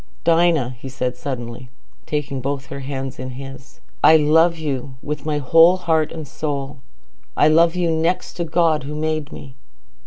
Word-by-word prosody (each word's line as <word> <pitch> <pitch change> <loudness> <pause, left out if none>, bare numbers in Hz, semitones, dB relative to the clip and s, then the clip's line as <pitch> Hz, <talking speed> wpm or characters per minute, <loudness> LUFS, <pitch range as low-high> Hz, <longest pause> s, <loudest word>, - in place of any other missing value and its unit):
"Dinah," 165 -7 +2
he 135 - -8
said 125 -1 -3
suddenly, 125 -2 -6 0.4
taking 145 -3 -3
both 140 +1 -3
her 140 - -8
hands 135 -1 -5
between 130 -1 -7
his, 135 0 -11 0.2
"I 160 - +8
love 160 +3 +3
you 140 -4 -4
with 150 +1 -5
my 150 -1 0
whole 165 +6 +5
heart 160 -3 0
and 160 -3 -7
soul. 140 -1 -4 0.6
I - - +5
love 165 +2 +4
you 175 -2 +1
next 165 +3 -1
to 175 - -1
God 165 -2 +2
who 145 +3 -6
made 155 -1 -2
me." 135 - -10
150 Hz, 165 wpm, -20 LUFS, 135-160 Hz, 0.6 s, I